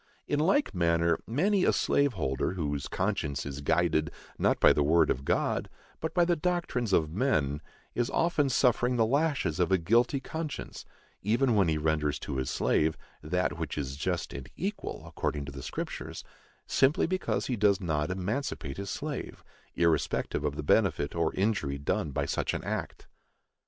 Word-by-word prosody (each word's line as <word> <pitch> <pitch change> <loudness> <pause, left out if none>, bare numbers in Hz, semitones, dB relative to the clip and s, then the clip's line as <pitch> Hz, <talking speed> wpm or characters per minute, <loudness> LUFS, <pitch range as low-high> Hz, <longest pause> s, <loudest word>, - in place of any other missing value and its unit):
In 145 - 0
like 195 - +2
manner, 85 -1 +2
many 185 - +2
a - - +4
slave 140 -2 +2
holder, 70 - -1
whose 75 -6 -2
conscience 70 0 -2
is 70 0 -5
guided, 80 0 +2 0.3
not - - +2
by - - +7
the 75 - +1
word 80 +4 +4
of 65 - -2
God, - - 0 0.3
but 160 - -4
by 175 -1 +5
the 175 0 +2
doctrines 170 - -1
of 80 -4 +2
men, 75 - 0 0.3
is 120 -1 0
often 160 -4 +2
suffering 125 -1 +2
the 115 -2 +3
lashes 140 - +1
of 90 +1 +2
a 95 - +5
guilty 115 - +2
conscience, 155 +2 -6 0.4
even 120 +5 +2
when 100 -4 +4
he 80 -1 +1
renders 75 -1 0
to 65 - -4
his 65 - -1
slave 80 0 +1 0.2
"that 90 +4 -1
which - - -4
is 70 -2 -3
just 85 +4 -2
and - - -7
equal," - - -4
according 70 -2 -3
to 70 - -7
the 70 -1 -8
Scriptures, - - -5 0.4
simply 135 +3 +3
because 185 +2 -1
he 125 - -1
does 100 -3 +3
not 80 -4 -1
emancipate 95 - -3
his 100 0 -5
slave, 145 +2 -5 0.3
irrespective 80 -3 +1
of 75 -1 -1
the 75 - -4
benefit 85 -5 +2
or 85 -2 +1
injury 95 -9 0
done 70 +2 -1
by 70 - -1
such - - -1
an - - -4
act. - - -4
90 Hz, 170 wpm, -29 LUFS, -, 0.4 s, by